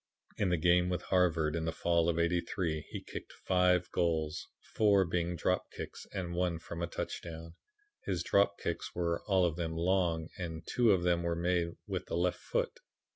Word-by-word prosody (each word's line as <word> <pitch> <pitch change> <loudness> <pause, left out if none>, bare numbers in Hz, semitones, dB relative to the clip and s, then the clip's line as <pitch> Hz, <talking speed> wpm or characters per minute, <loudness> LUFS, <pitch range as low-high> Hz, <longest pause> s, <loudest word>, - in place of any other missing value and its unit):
In 100 - +2
the 90 - +2
game 90 +2 +4
with 90 -1 -2
Harvard 85 -4 +2
in 80 -1 -1
the 80 - 0
fall 85 0 +2
of 85 - 0
'83, 85 -2 0
he - - -5
kicked - - -8
five 90 -1 +3
goals, 80 -3 0 0.3
four 100 -3 +4
being 85 0 -1
drop 90 +2 0
kicks - - -8
and 90 -3 -4
one 90 -1 0
from 85 +1 -7
a 85 - 0
touchdown. 80 -1 -6 0.5
His 90 -4 -1
drop 100 +2 +3
kicks 85 - -4
were 85 -1 0
all 95 -3 +4
of 85 -2 -1
them 80 -1 -2
long 85 -2 +1
and 80 -2 -4
two 120 -3 +3
of 95 -3 +3
them 90 -1 +2
were 85 0 0
made 85 0 0
with - - -4
the - - -2
left 90 0 +1
foot. - - -2
85 Hz, 185 wpm, -32 LUFS, 85-90 Hz, 0.5 s, game